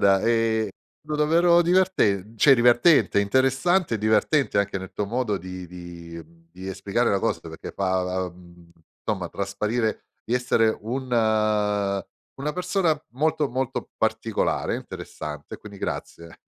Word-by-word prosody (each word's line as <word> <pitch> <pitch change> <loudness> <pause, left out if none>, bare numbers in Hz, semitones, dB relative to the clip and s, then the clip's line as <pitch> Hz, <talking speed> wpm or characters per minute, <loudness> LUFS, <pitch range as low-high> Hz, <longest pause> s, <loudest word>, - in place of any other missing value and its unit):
guarda, 95 -1 +4
ehm, 115 -2 +2 0.4
stato 150 - -2
davvero 170 +3 +4
diverten 140 - +2
cioè 135 +5 +7
divertente, 120 0 +4
interessante 130 - +2
e - - -1
divertente 110 +4 +2
anche 100 -1 0
nel 95 0 -9
tuo 105 - -2
modo 115 -2 -1
di 90 0 -8
di 85 -1 -9
mhmm, 85 +1 -25
di 95 +1 -9
esplicare 100 +5 0
la 100 - +2
cosa - - 0
perché - - -8
fa, 95 -1 -1
uhm, 85 -1 -15 0.3
insomma 95 -6 -2
trasparire 105 +3 -2 0.2
di 120 - -1
essere 115 -3 +2
un 125 +5 -3 1.3
una 150 +2 -3
persona 180 -3 +1
molto, 150 +4 0
molto 130 0 -3
particolare, - - 0
interessante 75 -1 -7
e - - -10
quindi 105 -1 -11
grazie. 85 -3 -5
110 Hz, 140 wpm, -24 LUFS, 95-135 Hz, 1.3 s, cioè